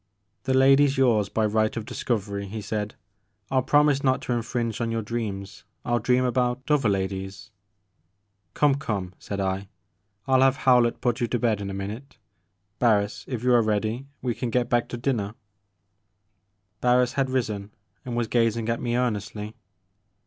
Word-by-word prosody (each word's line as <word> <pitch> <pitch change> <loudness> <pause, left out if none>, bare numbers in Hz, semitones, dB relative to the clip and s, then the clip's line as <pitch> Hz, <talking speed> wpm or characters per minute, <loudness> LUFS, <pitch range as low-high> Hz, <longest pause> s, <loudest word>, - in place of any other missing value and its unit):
"The 130 -1 +1
lady's 135 +1 +5
yours 115 -6 +3
by 110 - +1
right 110 +1 +1
of 110 - -4
discovery," 100 -4 -3
he 110 +3 -5
said, 105 0 -4 0.6
"I'll 130 -1 +3
promise 145 +1 +3
not 130 -1 +3
to 125 - -1
infringe 115 -1 -2
on 115 - 0
your 115 -1 -2
dreams, 105 -4 -5
— - - -43
^I - - -3
*11 120 -1 +2
dream 125 +2 +2
about 125 +1 0
other 135 -7 +3
ladies 95 +1 -3 0.3
" 95 -1 -47
" 100 -2 -48
Come, 145 -2 +4
come," 95 -8 -3
said 100 - -5
I, 95 0 -2 0.6
"I 130 -1 +4
'11 - - +4
have 135 0 +5
Howlett 125 -4 +3
put 120 -2 0
you 120 - +1
to 120 - 0
bed 110 -3 0
in 100 - -4
a 95 - -5
minute. 110 +8 -6 0.6
Barris, 105 -4 +2
if 125 -3 -4
you 125 0 +4
are 120 - +6
ready, 110 +4 -1
— - - -42
^we 120 -3 -1
can 125 - -3
get 120 +1 0
back 120 -1 +2
to 120 - -4
dinner 115 -5 -1 0.6
' 100 +1 -49
' 95 +1 -48
Barris 125 0 +3
had 135 -1 0
risen 110 -6 -2 0.3
and 120 -2 -5
was 120 - +1
gazing 115 -1 +1
at 115 - -1
me 120 -1 -1
ear 125 -1 +2
nestly. 105 +1 -6
115 Hz, 190 wpm, -25 LUFS, 100-125 Hz, 0.6 s, are